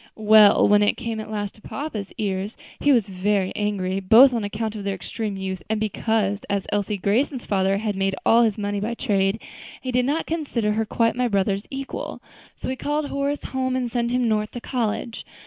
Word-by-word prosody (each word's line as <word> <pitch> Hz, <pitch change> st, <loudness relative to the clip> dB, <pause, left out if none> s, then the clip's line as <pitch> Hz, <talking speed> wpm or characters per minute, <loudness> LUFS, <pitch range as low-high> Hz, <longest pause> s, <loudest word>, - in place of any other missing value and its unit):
"Well, 215 Hz, -1 st, +6 dB
when 205 Hz, 0 st, +5 dB
it 205 Hz, -, +2 dB
came 225 Hz, -2 st, -4 dB
at 215 Hz, -, -7 dB
last 205 Hz, -2 st, -3 dB
to 215 Hz, -, -19 dB
papa's 225 Hz, -10 st, -5 dB
ears, 195 Hz, 0 st, -3 dB, 0.2 s
he 290 Hz, -, +3 dB
was 235 Hz, -6 st, +3 dB
very 195 Hz, 0 st, 0 dB
angry, 195 Hz, -2 st, -1 dB
both 230 Hz, +8 st, +7 dB
on 230 Hz, -3 st, -1 dB
account 215 Hz, +2 st, -3 dB
of 205 Hz, -, -5 dB
their 200 Hz, 0 st, -2 dB
extreme 205 Hz, +2 st, -5 dB
youth, 190 Hz, -2 st, -4 dB
and 220 Hz, -1 st, 0 dB
because, 215 Hz, -1 st, 0 dB
as 200 Hz, -1 st, -1 dB
Elsie 205 Hz, 0 st, -1 dB
Grayson's 240 Hz, +7 st, 0 dB
father 195 Hz, -1 st, +1 dB
had 210 Hz, -1 st, -2 dB
made 195 Hz, 0 st, 0 dB
all 230 Hz, +1 st, +6 dB
his 225 Hz, -3 st, +2 dB
money 205 Hz, -1 st, -2 dB
by 225 Hz, +4 st, -2 dB
trade, 200 Hz, -3 st, +1 dB, 0.4 s
he 255 Hz, -, -4 dB
did 250 Hz, 0 st, +2 dB
not 295 Hz, +5 st, 0 dB
consider 275 Hz, -10 st, -1 dB
her 220 Hz, +1 st, 0 dB
quite 230 Hz, +1 st, +1 dB
my 250 Hz, 0 st, +1 dB
brother's 200 Hz, -1 st, 0 dB
equal; 275 Hz, 0 st, -5 dB, 0.4 s
so -, -, -7 dB
he 260 Hz, -, -1 dB
called 295 Hz, +2 st, -2 dB
Horace 280 Hz, +1 st, -2 dB
home 260 Hz, -1 st, -2 dB
and 250 Hz, -2 st, -2 dB
sent 235 Hz, -1 st, 0 dB
him 250 Hz, 0 st, +1 dB
North 215 Hz, -1 st, 0 dB
to 245 Hz, -, -5 dB
college. 235 Hz, -2 st, -3 dB
215 Hz, 205 wpm, -23 LUFS, 200-245 Hz, 0.4 s, both